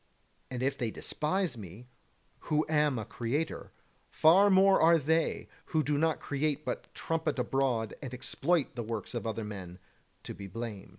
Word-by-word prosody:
And 125 -1 -4
if 140 +1 0
they 120 - 0
despise 160 - -1
me, 100 +4 -10 0.6
who 155 0 +2
am 150 -4 +2
a 110 - -3
creator, 140 +7 -3 0.4
far 185 +6 +6
more 195 0 +5
are 165 +1 +6
they, 160 +2 0 0.2
who 155 -2 +1
do 145 +2 0
not 160 +1 +1
create 145 +1 -2
but - - -4
trumpet 165 -2 -1
abroad 125 -3 0
and 130 -4 -6
exploit 150 +5 0
the 120 - -3
works 115 0 -4
of 120 -1 -3
other 110 0 -3
men, 95 -4 -7 0.5
to - - -6
be 100 - -8
blamed. 115 -1 -6
140 Hz, 165 wpm, -31 LUFS, 115-160 Hz, 0.6 s, far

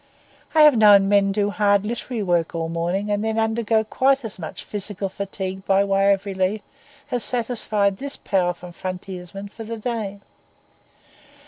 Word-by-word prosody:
I 310 - +7
have 300 -3 +7
known 205 -3 +7
men 200 -1 +3
do 205 0 0
hard 205 -1 +2
literary 235 0 -3
work 175 -3 0
all 165 -1 -2
morning, 175 +5 -2
and 205 +1 0
then 220 0 -1
undergo 225 0 +1
quite 265 +4 +1
as 210 -3 -7
much 160 - -7
physical 200 -1 -4
fatigue 190 -1 -5
by 195 0 +4
way 195 0 +3
of 195 0 0
relief 195 +1 -1 0.5
as 245 -2 0
satisfied 215 -5 0
this 280 +4 -2
powerful 180 -2 -1
frontiersman 185 +2 -7
for 225 +2 -9
the 230 +1 -6
day. 215 -3 -4
200 Hz, 155 wpm, -22 LUFS, 190-220 Hz, 0.5 s, I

